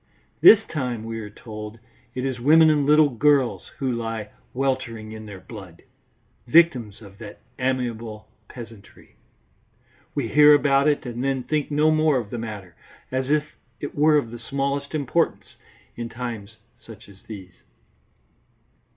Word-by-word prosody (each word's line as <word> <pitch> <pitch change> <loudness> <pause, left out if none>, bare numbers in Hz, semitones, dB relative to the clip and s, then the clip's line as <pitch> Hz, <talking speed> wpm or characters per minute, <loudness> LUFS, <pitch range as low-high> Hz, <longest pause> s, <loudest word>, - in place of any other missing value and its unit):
This 220 - +9
time, 125 - -4
we 115 0 -5
are 105 -2 -7
told, 105 +1 -9 0.4
it 130 +1 -2
is 130 -2 -3
women 155 +5 +6
and 145 -2 +1
little 150 0 +6
girls 135 +1 +2
who 135 -3 -1
lie 115 -3 -4 0.2
weltering 125 -5 -2
in 110 0 -9
their 100 -2 -9
blood, 95 -6 -12 0.6
victims 120 -8 +3
of 100 0 -15
that 105 -3 -10 0.2
amiable 115 -4 -3 0.2
peasantry. 115 -4 -13 1.0
We 135 -6 -1
hear 150 +2 +7
about 140 0 +3
it, 145 -2 +1
and 120 0 -4
then 135 -2 -1
think 150 +2 -1
no 150 +1 +3
more 155 -2 +3
of 115 -5 -5
the 120 - -4
matter, 105 -6 -7 0.4
as 130 +1 -2
if 150 0 +2 0.3
it 145 - -6
were 150 +1 +4
of 120 -6 -2
the 120 - -8
smallest 140 +4 -3
importance 155 +3 -1 0.4
in 120 0 -5
times 115 -3 -7 0.2
such - - -14
as 100 -1 -17
these. 95 -5 -11
125 Hz, 150 wpm, -23 LUFS, 110-145 Hz, 1.0 s, This